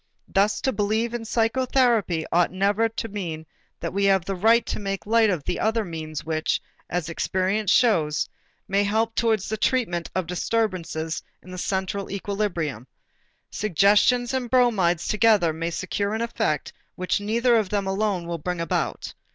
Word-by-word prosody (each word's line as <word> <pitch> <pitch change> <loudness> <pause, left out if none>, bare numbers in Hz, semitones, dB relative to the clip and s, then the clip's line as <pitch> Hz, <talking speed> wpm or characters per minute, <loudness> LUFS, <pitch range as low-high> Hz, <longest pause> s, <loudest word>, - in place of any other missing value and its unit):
Thus 200 +1 +1
to 265 - +1
believe 220 +1 0
in 235 -1 -4
psychotherapy 230 -6 +1
ought 175 0 +3
never 200 +4 +1
to 225 0 -4
mean 170 -7 -5 0.3
that - - -4
we 200 +1 +1
have 190 -3 +3
a 195 - -1
right 225 +5 +4
to - - -3
make 195 -1 -4
light 225 0 +4
of 175 -7 -1
the - - -2
other 220 0 +1
means 155 -4 -6
which, 160 0 0 0.3
as 175 -2 -2
experience 190 +4 -1
shows, 165 -11 +3 0.4
may 200 +1 +2
help 220 +3 0
towards 220 -4 +1
the 220 - -2
treatment 210 -7 0
of 185 -2 0
disturbances 175 -4 -2 0.2
in 185 - -12
the 185 - -6
central 190 +1 -2
equilibrium. 185 - -3 0.6
Suggestions 215 - +3
and 255 -2 -2
bromides 210 -10 +2
together 210 -6 +3
may 165 +1 -3
secure 200 +4 -2
an 220 - -2
effect 220 -10 -1 0.2
which 185 +2 -1
neither 235 +4 +2
of 215 -4 +1
them 200 -2 -1
alone 195 -2 -1
will 170 -1 -4
bring 180 +2 -3
about. 165 -2 -2
200 Hz, 160 wpm, -24 LUFS, 175-225 Hz, 0.6 s, right